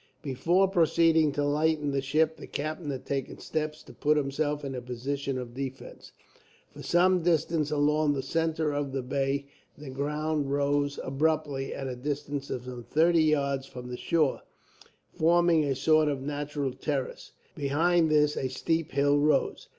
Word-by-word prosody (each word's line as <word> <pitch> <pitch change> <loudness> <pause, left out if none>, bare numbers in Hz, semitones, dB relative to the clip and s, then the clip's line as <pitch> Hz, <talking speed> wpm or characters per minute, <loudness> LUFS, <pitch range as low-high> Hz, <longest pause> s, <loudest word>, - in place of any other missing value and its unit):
Before 170 +8 +2
proceeding 165 -3 +3
to 145 0 0
lighten 150 0 +1
the 140 0 0
ship, 155 +4 +1
the - - -10
captain 155 +1 -4
had 135 -2 -5
taken 135 -2 -3
steps 155 -1 -4
to - - -14
put 150 0 +2
himself 145 +1 -1
in 135 - -4
a 125 - -4
position 130 +3 -3
of 125 -2 -6
defence. 130 0 -7 0.6
For - - -10
some 180 +1 +3
distance 160 -2 +1
along 150 0 +2
the 135 -2 -3
centre 160 +1 0
of 145 -2 -2
the 135 -2 -2
bay 140 +2 -1 0.3
the 145 -2 -9
ground 150 +1 -2
rose 145 0 0
abruptly, 145 -1 -1
at 135 - -5
a 130 -1 -4
distance 140 +1 -4
of 125 - -4
some 125 -1 -7
thirty 165 +6 +3
yards 140 -3 +1
from 125 -2 -9
the 125 - -4
shore, 155 -2 +1 0.7
forming 170 0 +3
a 140 -2 0
sort 155 +3 +3
of 140 -2 -1
natural 145 -1 -3
terrace. 135 0 -4 0.2
Behind 160 +4 +2
this 150 -1 +3
a 130 - -1
steep 160 +5 -1
hill 145 +1 +3
rose. 150 +1 +1
145 Hz, 165 wpm, -28 LUFS, 135-155 Hz, 0.7 s, proceeding